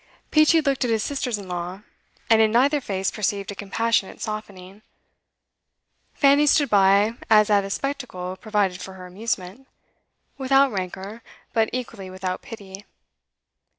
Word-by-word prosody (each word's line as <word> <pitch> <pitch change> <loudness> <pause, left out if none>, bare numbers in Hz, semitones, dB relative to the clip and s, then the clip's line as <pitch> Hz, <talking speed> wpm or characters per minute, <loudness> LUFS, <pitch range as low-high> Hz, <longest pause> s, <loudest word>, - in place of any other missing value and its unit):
Peachey 310 +1 +5
looked 275 -3 0
at 245 - 0
his 220 -1 +1
sisters 260 -5 -2
in 200 -2 -9
law, 180 +2 -5 0.5
and 225 -1 +5
in 220 -1 +4
neither 280 +5 +3
face 195 -5 -2
perceived 200 -1 -2
a - - -8
compassionate 210 +1 -1
softening. 200 -2 -7 1.3
Fanny 285 +1 +4
stood 285 -2 +3
by 200 +2 +4 0.2
as 215 -1 +5
at 200 -1 +4
a 195 - -6
spectacle 220 -8 -4
provided 195 -2 -1
for 190 - -8
her 185 -1 -10
amusement, 195 +4 -5 0.7
without 270 0 +4
rancour, 195 +3 -5 0.3
but 225 -1 +2
equally 230 -6 -6
without 185 0 -4
pity. 200 -3 -10
210 Hz, 140 wpm, -23 LUFS, 190-250 Hz, 1.3 s, Peachey